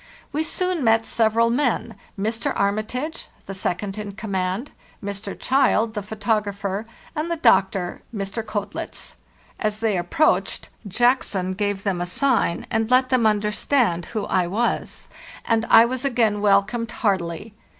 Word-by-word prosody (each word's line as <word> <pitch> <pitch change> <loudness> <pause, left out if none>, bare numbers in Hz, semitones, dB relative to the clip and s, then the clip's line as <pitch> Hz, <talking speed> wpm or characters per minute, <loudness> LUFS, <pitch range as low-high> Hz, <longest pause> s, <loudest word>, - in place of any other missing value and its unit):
We 305 - +1
soon 360 0 -1
met 225 -1 +4
several 230 +1 +2
men—Mr. 230 -3 -2
Armitage, 215 +10 -2 0.2
the 195 - -6
second 195 +2 -3
in 205 -1 -5
command; 195 +3 -3 0.3
Mr. 200 0 -5
Child, 250 -4 +2
the 210 - -3
grapher; 205 -1 -2 0.3
and 310 +2 -2
the 340 - 0
doctor, 190 - +2
Mr. 200 0 -3
Koetlitz. 210 -2 -5 0.5
As 215 0 -1
they 225 -1 +1
photo - - +1
approached, 175 - +1 0.2
Jackson 200 -4 +1
gave 205 0 -2
them 190 -4 -1
a 175 - -2
sign, 235 -3 +1
and 220 0 0
let 255 +1 +4
them 250 -4 +4
understand 210 -2 +1
who 215 -3 -3
I 185 -2 +1
was; 225 +7 -2 0.4
and 225 -1 +1
I 225 - +8
was 255 +2 -3
again 230 -6 +1
welcomed 210 +3 +2
heartily. 195 -2 -2
215 Hz, 140 wpm, -23 LUFS, 200-240 Hz, 0.5 s, I